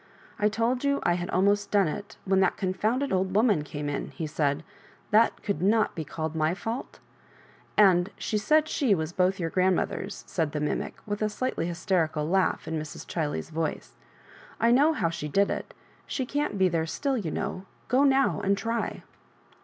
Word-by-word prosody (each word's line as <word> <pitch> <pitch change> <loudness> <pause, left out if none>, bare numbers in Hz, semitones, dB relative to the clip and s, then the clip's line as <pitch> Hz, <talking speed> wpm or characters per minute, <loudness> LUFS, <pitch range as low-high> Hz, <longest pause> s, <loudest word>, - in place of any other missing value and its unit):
" - - -24
I 210 - +3
told 230 +4 0
you 280 0 +2
I 175 - +3
had 175 0 -3
almost 200 +2 +2
done 200 -4 +3
it 200 +7 -6
when 190 -1 +3
that 190 -1 +2
confounded 215 +8 0
old 185 0 0
woman 210 -8 +3
came 145 0 -5
in," 145 -1 -3
he 160 - -5
said: 150 0 0 0.2
" - - -29
that 220 +2 +3
could 200 -7 -2
not 215 +3 +3
be 160 - -4
called 160 +2 -4
my 160 +2 +1
fault?" 225 +5 -5 0.8
"And 185 -3 +5
she - - -3
said 310 +7 +3
she 270 -9 +2
was 160 0 -3
both 185 +2 +1
your 165 -2 -2
grand 185 0 +3
mothers," 195 +3 -3
sai4 160 -4 -1
the 150 - -1
mimie, 150 - -2
with 205 0 -3
a 215 - +2
slightly 235 -5 -2
hysteri 175 -1 0
cal 150 -1 -2
laugh 185 -2 +1
in 160 0 -2
Mrs. 155 0 -7
Chiley's 155 -1 -3
voice. 160 0 -3 0.4
" - - -21
I 230 - +4
know 290 +6 +5
how 170 - 0
she 160 -3 -4
did 200 +7 +2
it - - -4 0.4
She 260 - -2
can't 285 -5 -2
be 190 -1 +4
there 165 -2 0
still, 275 - -1
you 205 -10 -2
know 195 +2 -4
— - - -34
go 260 +3 +3
now 270 - +3
and 200 0 +2
try." 230 +2 -2
190 Hz, 205 wpm, -27 LUFS, 165-220 Hz, 0.8 s, And